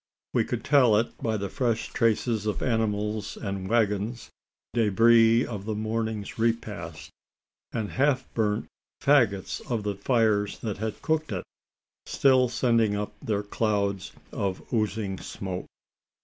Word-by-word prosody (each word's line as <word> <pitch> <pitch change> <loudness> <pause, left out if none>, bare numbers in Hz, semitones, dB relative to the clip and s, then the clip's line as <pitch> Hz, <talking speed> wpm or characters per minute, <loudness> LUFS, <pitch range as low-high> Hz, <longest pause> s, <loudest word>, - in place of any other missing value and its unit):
We - - +2
could - - -3
tell 130 -7 +5
it 115 +2 -1
by 110 -1 0
the 100 -1 -3
fresh 115 +2 -1
traces 115 -1 +1
of 105 - -1
animals 105 -3 -1
and 100 -2 -4
waggons 110 0 0 0.4
debris 115 +1 +5
of 105 -4 -6
the 110 -1 -2
morning's 110 0 -3
repast 100 -10 -2 0.6
and 110 -3 -3
half 135 -1 +1
burnt 105 -2 0 0.3
faggots 115 -10 +2
of 115 -4 -1
the 105 -1 -1
tires 105 -2 +1
that 105 -4 -3
had 110 0 -4
cooked 155 -3 0
it, 90 -3 -3 0.6
still 130 -2 +4
sending 115 -4 +2
up 105 0 -3
their 105 -2 -1
clouds 100 -2 -1 0.2
of 95 -2 -2
oozing 105 -3 -1
smoke. 95 -2 -5
110 Hz, 135 wpm, -27 LUFS, 100-115 Hz, 0.6 s, tell